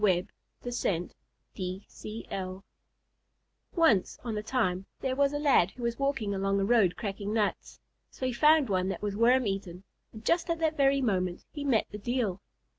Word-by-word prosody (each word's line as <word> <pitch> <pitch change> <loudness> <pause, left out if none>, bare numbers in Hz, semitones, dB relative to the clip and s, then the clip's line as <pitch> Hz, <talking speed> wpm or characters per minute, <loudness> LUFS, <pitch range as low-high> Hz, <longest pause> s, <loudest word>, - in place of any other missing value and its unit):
IV 185 -1 +3 0.3
THE 245 0 -4
LAD 195 - +2
AND 175 +2 -7 0.4
THE 185 0 -4 0.5
DEIL 185 0 -5 1.1
Once 320 - +3
on 230 -3 -3
a 210 - -2
time 195 -5 -1
there 260 -1 -1
was 280 0 +3
a 290 - -2
lad 280 - +4
who 245 - -10
was 235 +1 -1
walking 275 -7 0
along 195 0 0
a 195 - +1
road 205 -6 +4
cracking 205 0 -4
nuts, 210 -2 -1 0.3
so 260 - -5
he 255 - 0
found 300 +2 +5
one 185 -2 0
that 195 - -4
was 205 -1 -2
worm 245 +3 +4
eaten, 195 -2 -4 0.3
and 220 0 -12
just 340 +1 +2
at 335 - +1
that 320 -1 0
very 275 -1 +3
moment 185 -6 -1
he 290 - -5
met 255 -6 +2
the 210 - -6
Deil. 220 -4 -1
215 Hz, 190 wpm, -29 LUFS, 195-265 Hz, 1.1 s, found